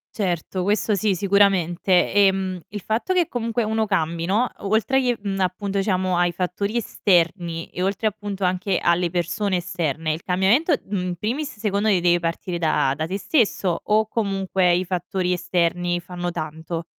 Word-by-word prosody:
Certo, 185 -2 -2
questo 210 +2 +1
sì, 200 +1 +1
sicuramente. 190 -2 +2
Ehm, 190 -2 +2
il 205 0 -6
fatto 225 - -1
che 355 -3 +2
comunque 230 -1 -1
uno 220 0 0
cambi, 165 -4 -1
no, 215 +7 +1
oltre 220 +6 +1
che 245 -2 +1
mhmm, 195 -1 -3
appunto 195 +1 -1
diciamo 185 -2 0
ai 175 0 +2
fattori 185 +5 -2
esterni 175 -5 0
e 180 - -4
oltre 195 +3 0
appunto 205 -2 -4
anche 185 +1 0
alle 170 0 +1
persone 185 +3 -1
esterne, 165 -3 -2
il 160 +2 -4
cambiamento, 195 - +2
mhmm, 200 -1 -3
in 180 -1 -3
primis 235 - -3
secondo 210 0 0
me - - +4
ti 180 - +1
deve 175 0 +3
partire 170 +1 -3
da 155 -5 +1
da 155 - -1
te 190 +4 -3
stesso, 195 - +1
o 215 +1 +2
comunque 195 -4 +1
i 180 +1 +1
fattori 180 0 -2
esterni 175 0 0
fanno 175 0 -5
tanto? 160 +1 -5
185 Hz, 170 wpm, -23 LUFS, 175-205 Hz, -, me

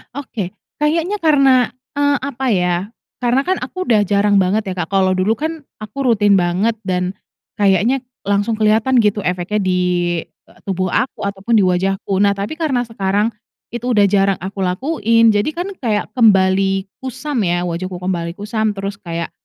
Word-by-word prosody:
Oke. 230 -10 -5 0.3
Kayaknya 330 +7 +1
karena 280 -5 +5 0.4
eee, 285 0 +2
apa 265 -1 -4
ya, 180 -3 +2 0.5
karena 245 +2 +2
kan 375 0 +1
aku 370 +9 -4
udah 220 -3 +4
jarang 205 +1 +2
banget 200 +3 0
ya, 190 - -2
Kak. 175 -3 -3
Kalau 190 -1 +2
dulu 195 +5 +1
kan 315 0 -3 0.2
aku 215 +6 -5
rutin 205 -2 +4
banget 185 +5 +1
dan 185 0 -2 0.4
kayaknya 205 +6 +2 0.2
langsung 205 +2 +1
kelihatan 220 +4 +3
gitu 210 -2 +2
efeknya 180 +3 -1
di, 185 -1 +1 0.5
eee, - - -26
tubuh 185 -1 -1
aku 255 - -1
ataupun 200 +3 -2
di 210 - +5
wajahku. 190 +1 0
Nah, 200 0 +3
tapi 205 +12 -5
karena 270 -7 0
sekarang 210 -1 -1 0.4
itu 240 +1 -5
udah 220 -5 +4
jarang 195 0 +3
aku 195 +1 -6
lakuin, 230 - +2
jadi 205 0 +1
kan 360 +3 -3
kayak 220 -6 -1
kembali 195 -3 +3
kusam 265 +1 -4
ya, 175 -3 0
wajahku 180 +1 -4
kembali 170 -2 -2
kusam 215 +1 -2
terus 200 0 -5
kayak, 170 -4 -5
205 Hz, 165 wpm, -18 LUFS, 190-245 Hz, 0.5 s, karena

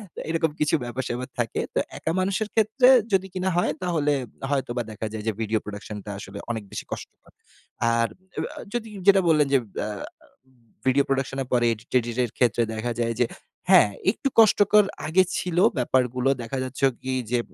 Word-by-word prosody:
তো - - -7
এরকম 165 -1 +1
কিছু 150 +2 +3
ব্যাপার-স্যাপার 125 0 -4
থাকে। 115 - -1
তো - - +3 0.2
একা 160 - -2
মানুষের 195 +3 0
ক্ষেত্রে 225 +4 +4 0.3
যদি 190 0 +2
কিনা 185 +1 0
হয় 175 - +2
তাহলে 155 -5 +1 0.4
হয়তোবা 130 -3 -1
দেখা 110 +1 -4
যায় 105 -1 -5
যে - - +3
ভিডিও 110 0 0
প্রোডাকশনটা 105 0 -7
আসলে 100 +1 -8
অনেক 110 -2 -4
বেশি - - -5
কষ্টকর। - - -9 0.6
আর 115 0 +2 0.3
এবা - - -2 0.2
যদি 225 -2 -3 0.2
যেটা 195 -1 +7
বললেন 150 -3 +4
যে 135 - +6 0.2
অ্যা - - -2 1.0
ভিডিও 135 +2 +4
প্রোডাকশন 135 0 -1
এর - - -13
পরে 120 -1 +3
এডিট-টেডিট 120 +1 -2
এর 115 - -3
ক্ষেত্রে 120 -2 +2
দেখা 120 +2 -2
যায় 115 0 0
যে 120 - +4 0.4
হ্যাঁ, 105 - +7 0.2
একটু 275 - -3
কষ্টকর 210 -1 +6 0.2
আগে 185 +4 +4
ছিল 175 -1 -3 0.2
ব্যাপারগুলো 125 +1 +1
দেখা 130 +4 -4
যাচ্ছে 130 +1 -1 0.2
কি 130 0 -2 0.2
যে 120 - +2
130 Hz, 170 wpm, -25 LUFS, 115-175 Hz, 1.0 s, যেটা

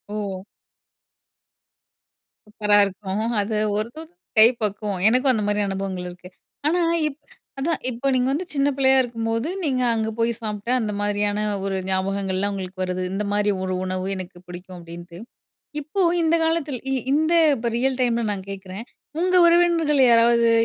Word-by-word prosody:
ஓஹ். 200 -3 -4 2.1
சூப்பரா 210 -1 +1
இருக்கும். 195 +1 -4 0.2
அது 215 +1 -2 0.2
ஒரு 215 +2 -2 0.5
கை 220 - +9
பக்குவோம் 205 -2 -2
எனக்கும் 255 +3 +4
அந்த 215 -3 -1
மாரி 205 0 +1
அனுபவங்கள் 190 -2 -4
இருக்கு. 180 +1 -12 0.4
ஆனால 340 +1 +2 0.2
இப் 295 0 -7 0.4
அதான் 320 +4 -1
இப்போ 250 +2 -3
நீங்க 250 0 +1
வந்து 335 +6 -2
சின்ன 280 0 +1
பிள்ளையா 265 -1 +4
இருக்கும்போது. 230 +1 -2 0.2
நீங்க 260 -5 0
அங்கே 220 -1 -1
போய் 230 +1 +2
சாப்பிட்டா 215 +2 -3
அந்த 215 - -2
மாரியான 205 0 0 0.3
ஒரு 195 -1 -1
ஞாபகங்கள்லாம் 190 +1 -1
உங்களுக்கு 185 -1 -6
வருது. 185 0 -3
இந்த 205 +2 -2
மாரி 205 0 +1
ஒரு 185 0 -2
உணவு 185 0 -3
எனக்கு 185 -1 -8
பிடிக்கும். 180 +1 -10
அப்படின்ட்டு, 170 +1 -11 0.6
இப்போந்த 335 +1 +1
காலத்தில 320 -5 -1 0.3
இந்த 315 +3 +2 0.2
இப்போ 235 +1 -2
ரியல் 260 +1 0
டைமில 235 -2 +1
நான் 195 -1 -6
கேட்கிறேன். 195 +2 -7 0.4
உங்க 365 +1 +1
உறவினர்கள் 335 -4 +3
யாராவது 235 0 +4
215 Hz, 140 wpm, -22 LUFS, 195-265 Hz, 2.1 s, கை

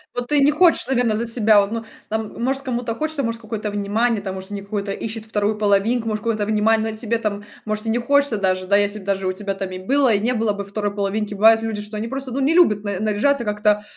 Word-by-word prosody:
вот 245 0 -3
ты 295 -1 +4
не 280 +1 +5
хочешь, 335 +3 +3
наверно, 245 -4 +1
за 235 - -1
себя 220 -2 +4
вот, 200 0 0
ну, 230 - -3 0.2
там 220 +1 -4
может, 270 +2 0
кому-то 245 -3 -3
хочется, 310 +2 -2
может, 230 0 -3
какое-то 220 -1 -4
внимание 205 +2 0
там, 190 -1 -5
может, 190 +1 -8
они 200 -1 -4
какое-то 200 0 -4
ищет 220 +1 -6
вторую 210 -1 -1
половинку, 215 +3 +1
может, 215 -1 -2
какое-то 220 -3 -1
внимание 220 +1 +1
на 215 - -8
тебе 230 +1 -1
там, 205 -2 -3 0.2
может 215 +1 -3
и - - -1
не 230 - +1
хочется 280 -1 +2
даже 185 -1 0
да, 200 +2 +3
если 205 +1 +1
б 190 - -13
даже 195 -1 -1
у 185 - 0
тебя 195 +1 -4
там 195 -1 -5
и 185 - -6
было, 260 +5 +2
и 200 - +2
не 235 +4 0
было 220 -3 0
бы 200 0 -5
второй 205 0 -3
половинки. 205 +1 -2
Бывает 225 +2 +5
люди, 220 -2 -3
что 210 +1 -6
они 220 - -3
просто 270 +1 -4
ну 260 - -2
не 275 +4 +2
любят 215 - +4
на 200 -2 -3
наряжаться 220 +6 +1
как-то, 210 -1 +1
215 Hz, 260 wpm, -21 LUFS, 205-235 Hz, 0.2 s, не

